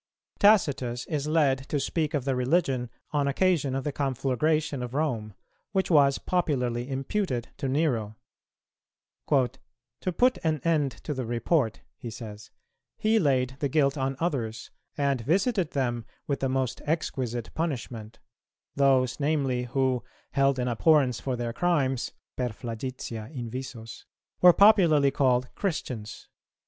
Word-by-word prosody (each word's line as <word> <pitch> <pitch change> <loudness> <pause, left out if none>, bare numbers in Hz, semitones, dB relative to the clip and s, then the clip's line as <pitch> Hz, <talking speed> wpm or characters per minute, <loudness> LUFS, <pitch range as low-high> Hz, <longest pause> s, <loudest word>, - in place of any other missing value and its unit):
Tacitus 140 - +3
is 150 -2 -2
led 140 -4 +2
to 145 - 0
speak 155 +1 -1
of 135 -3 -1
the 135 -2 +1
Religion, 130 -2 +1 0.2
on 145 -2 +1
occasion 145 -3 +1
of 135 - -2
the 150 - -2
conflagration 140 +2 0
of 125 +1 -5
Rome, 115 -9 -1 0.4
which 190 -2 0
was 140 -3 +5
popularly 125 -8 -1
imputed 135 - -2
to 140 - -2
Nero. 125 -7 0 1.1
"To 125 +1 -2
put 250 +8 +2
an 155 -2 +1
end 150 -5 +1
to 150 - -3
the 130 -4 -4
report," 120 0 0 0.2
he 120 - -7
says, 110 -1 -9 0.5
"he 220 +1 +3
laid 130 - +1
the 140 - 0
guilt 140 -1 +2
on 135 -1 -1
others, 120 -10 -2 0.3
and 140 -3 +1
visited 185 - +1
them 120 -4 -1 0.2
with 140 -4 -1
the 135 - 0
most 130 -2 -1
exquisite 125 -7 -2
punishment, 120 -8 -4 0.6
those, 135 -3 +3
namely, 140 -4 0
who, 130 0 0 0.3
held 135 -1 +2
in 125 0 -1
abhorrence 130 0 +3
for 130 -2 -2
their 120 -1 -3
crimes 140 -6 0 0.2
(per 125 -1 -1
flagitia 115 -1 -6
invisos), 120 -3 -7 0.4
were 180 - +10
popularly 170 -9 +5
called 125 -2 +1
Christians. 125 - -4
135 Hz, 135 wpm, -27 LUFS, 125-155 Hz, 1.1 s, were